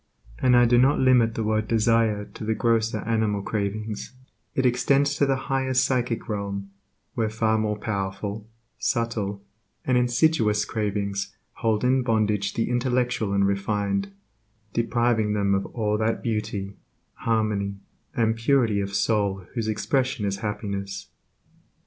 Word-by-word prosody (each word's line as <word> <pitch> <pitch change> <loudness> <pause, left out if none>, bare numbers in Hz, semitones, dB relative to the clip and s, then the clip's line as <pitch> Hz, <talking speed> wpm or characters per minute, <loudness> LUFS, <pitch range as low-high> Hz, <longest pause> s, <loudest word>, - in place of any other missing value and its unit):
And 125 -1 +4
I 120 - +6
do 120 +1 +4
not 135 +3 +4
limit 125 -4 +4
the 115 - -1
word 110 0 0
desire 115 -2 +2
to - - -10
the 110 +1 0
grosser 115 -1 +1
animal 110 -3 0
cravings; 105 +2 -3 0.4
it 130 - +1
extends 140 +3 +3
to 140 - +3
the 135 - +2
higher 135 -1 0
psychic 125 -3 +1
realm, 100 -2 -4 0.4
where 110 -2 0
far 110 0 +1
more 105 -1 -1
powerful, 100 +1 -4 0.3
subtle, 105 -4 -1 0.4
and 125 -1 +3
insidious 120 -4 +2
cravings 100 -2 -2 0.2
hold 110 -1 0
in 130 +1 +3
bondage 105 -4 0
the 115 - 0
intellectual 125 -3 0
and 100 0 +3
refined, 100 0 -1 0.6
depriving 115 -2 +1
them 100 -1 +1
of 100 0 0
all 105 -2 -1
that 110 +1 0
beauty, 105 -3 -3 0.4
harmony, 105 -3 -1 0.4
and 115 -1 +2
purity 115 -3 +2
of 100 0 -4
soul 100 -2 +1
whose 115 -3 -2
expression 130 +2 0
is 100 0 -1
happiness. 100 -1 -4
110 Hz, 135 wpm, -25 LUFS, 100-120 Hz, 0.6 s, I